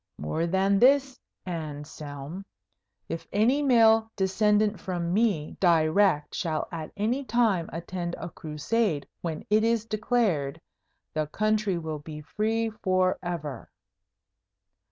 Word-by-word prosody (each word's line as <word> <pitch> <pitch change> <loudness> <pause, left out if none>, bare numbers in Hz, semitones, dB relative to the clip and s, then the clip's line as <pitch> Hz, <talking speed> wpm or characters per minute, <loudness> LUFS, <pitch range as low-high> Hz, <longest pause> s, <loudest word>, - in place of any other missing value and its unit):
More 160 - -2
than 195 +2 +2
this, 270 +1 +4 0.3
Anselm, 150 0 -6 0.6
if 165 - -5
any 235 +8 +3
male 225 -4 +5
descendant 210 +1 +2
from 175 -2 -2
me 200 -8 +1
direct 165 -1 +3
shall 160 -5 -2
at 160 -2 -6
any 235 +7 0
time 220 -8 +1
attend 175 +1 -4
a - - -6
Crusade 155 +2 -1
when 160 -3 -4
it 215 +1 +4
is 230 -1 +1
declared, 215 - 0 0.5
the 155 -1 -1
country 215 +1 0
will 160 -2 -4
be 150 +1 -8
free 220 +7 -1
forever.' 175 -7 -1
185 Hz, 115 wpm, -27 LUFS, 160-220 Hz, 0.6 s, male